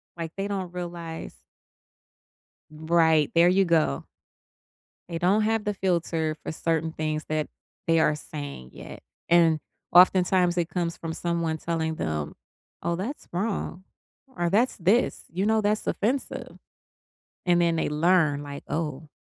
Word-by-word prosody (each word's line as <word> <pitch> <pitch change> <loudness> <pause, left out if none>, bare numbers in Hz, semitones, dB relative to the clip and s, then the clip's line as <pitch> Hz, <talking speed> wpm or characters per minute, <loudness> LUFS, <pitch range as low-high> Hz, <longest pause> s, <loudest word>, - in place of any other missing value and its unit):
Like, 165 -1 -5
they 195 - -2
don't 190 -3 -3
realize 170 -2 -6 1.3
Right, 160 -1 +3
there 170 +1 +6
you 195 +2 +4
go. 160 - +1 1.0
They 170 -2 -3
don't 195 +5 +3
have 220 0 +1
the 210 -1 -1
filter 165 -4 0
for - - -4
certain 160 0 -1
things 155 -1 -2
that 155 -1 -1 0.4
they 165 -1 +4
are 150 -1 +3
saying 145 - -8
yet, - - -10 0.3
and 165 -2 +5 0.3
oftentimes, 180 0 +5
it 170 -1 0
comes 170 -2 -2
from 165 -1 -5
someone 170 -2 -1
telling 160 -1 -2
them, 75 - -3 0.5
"Oh, 170 - 0
that's 225 - -5
wrong," 190 -1 -3 0.5
or 175 0 0
"That's 230 +7 +2
this," 200 +7 +2
you 185 +4 -2
know, 220 0 +3
"That's 210 +1 0
offensive," 250 +6 -2 0.9
and 175 -1 +3
then 170 -1 +2
they 160 - 0
learn, 150 -2 +3
like, 140 -1 -8
"Oh" 155 -1 -3
170 Hz, 140 wpm, -26 LUFS, 160-185 Hz, 1.3 s, there